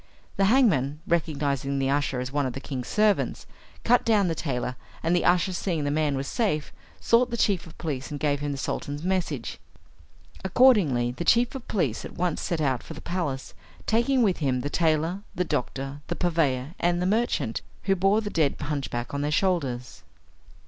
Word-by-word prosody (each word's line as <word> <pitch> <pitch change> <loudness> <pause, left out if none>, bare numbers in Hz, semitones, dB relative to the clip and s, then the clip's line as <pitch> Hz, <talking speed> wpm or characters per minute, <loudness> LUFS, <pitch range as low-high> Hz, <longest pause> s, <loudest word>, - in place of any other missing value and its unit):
The 195 - +3
hangman, 185 - +3
recognising 140 -4 0
the 135 0 +1
usher 140 -2 0
as 125 +1 -4
one 145 -1 0
of 125 - -4
the 135 - -5
king's 130 -3 -5
servants, 210 -1 +1 0.4
cut 245 +1 +4
down 210 -5 +3
the - - +1
tailor, 125 -5 -3 0.3
and 165 +2 +2
the 175 - +2
usher, 180 +1 +3
seeing 170 -4 -1
the 145 - 0
man 150 -2 +1
was 135 +1 -3
safe, 155 -11 -1 0.3
sought 240 +1 +3
the 235 - -3
chief 195 -6 +1
of 165 - -14
police 140 -4 -4
and 145 - -5
gave 145 -1 +1
him 145 0 -2
the 140 - -3
Sultan's 145 +2 -4
message. 175 -9 -2 0.8
Accordingly, 190 - +4
the 130 - -5
chief 235 +7 +3
of 265 -3 -8
police 150 - -1
at - - -9
once 175 -2 0
set 170 -3 -1
out 130 -4 +1
for 160 - -9
the - - -9
palace, 160 -7 -3 0.3
taking 240 +3 +2
with 195 -5 +2
him 130 -4 0
the 145 +3 -3
tailor, 165 +3 +1
the 180 +1 0
doctor, 135 -1 -3
the 175 - -2
purveyor, 155 -6 0
and 175 0 +1
the 180 - 0
merchant, 190 - 0 0.2
who 195 0 +2
bore 195 +4 +3
the 205 -1 -4
dead 155 -4 +2
hunchback 135 -4 -3
on 140 - -1
their 145 - 0
shoulders. 145 -8 -1
155 Hz, 190 wpm, -26 LUFS, 140-190 Hz, 0.8 s, cut